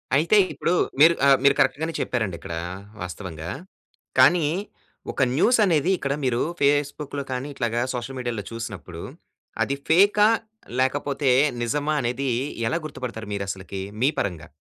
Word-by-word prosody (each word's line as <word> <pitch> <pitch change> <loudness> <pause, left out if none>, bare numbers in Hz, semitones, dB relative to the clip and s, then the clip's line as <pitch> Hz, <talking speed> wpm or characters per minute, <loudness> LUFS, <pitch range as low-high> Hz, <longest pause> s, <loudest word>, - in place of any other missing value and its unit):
అయితే 170 +8 +4 0.2
ఇప్పుడు 170 - 0 0.3
మీరు 165 +3 +8
ఆహ్, 135 -1 +7
మీరు 140 0 +5
కరెక్ట్ 145 - +3
గానే 165 0 -2
చెప్పారండి 110 -8 -1
ఇక్కడ 80 - -6 0.5
వాస్తవంగా. 90 -3 -6 0.7
కానీ 150 +4 +6 0.6
ఒక - - -3
న్యూస్ 235 - +4
అనేది 165 -1 +2
ఇక్కడ 140 -3 -2
మీరు 125 -1 +1 0.2
ఫేస్‌బుక్‌లో 145 0 0
కానీ, 125 +2 -3
ఇట్లాగా 120 -2 -1
సోషల్ 125 +2 -5
మీడియాలో 120 -5 -3
చూసినప్పుడు 100 -7 -7 0.6
అది 140 - -1
ఫేకా? 205 +5 +5 0.5
లేకపోతే 140 +1 0 0.3
నిజమా? 145 +5 0
అనేది 125 +3 -2 0.4
ఎలా 165 - 0
గుర్తుపడతారు 120 -6 -6
మీరు 100 -1 -2
అసలకి, 95 0 -5 0.2
మీ 135 - +5
పరంగా? 85 -6 -3
135 Hz, 135 wpm, -24 LUFS, 115-150 Hz, 0.7 s, మీరు